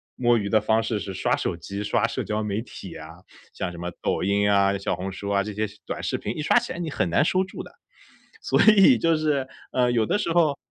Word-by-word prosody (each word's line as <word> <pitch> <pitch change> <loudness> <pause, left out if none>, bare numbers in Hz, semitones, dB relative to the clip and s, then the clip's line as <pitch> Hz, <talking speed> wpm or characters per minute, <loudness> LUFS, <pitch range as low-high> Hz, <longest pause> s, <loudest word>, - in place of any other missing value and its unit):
摸 120 -1 +3
鱼 100 -2 -2
的 110 - +4
方 110 +1 +2
式 110 -2 -2
是 95 - -6
刷 95 - +1
手 - - -2
机、 100 +4 -6
刷 - - +1
社 - - -3
交 105 0 -2
媒 105 +1 -2
体 100 -5 -10
啊， 80 +3 -11 0.3
像 90 -2 -4
什 85 - -10
么 85 +1 -5
抖 - - -1
音 100 +1 +2
啊、 100 0 +3
小 100 - -2
红 95 +1 -5
书 100 +1 -6
啊， 100 -1 +2
这 105 - -6
些 105 +1 -1 0.2
短 - - -5
视 - - -1
频 105 - -5
一 - - -2
刷 150 - +3
起 - - -6
来 - - -7
你 170 -2 -3
很 95 - -1
难 115 - +3
收 185 +3 +2
住 185 - -8
的。 - - -13 0.7
所 - - +1 0.2
以 200 +7 +7
就 165 -1 +2
是， 145 -4 0 0.2
呃， 125 -1 +2
有 115 -2 +2
的 - - +1
时 205 -5 -2
候 155 -5 +3
105 Hz, 275 characters per minute, -24 LUFS, 100-140 Hz, 0.7 s, 以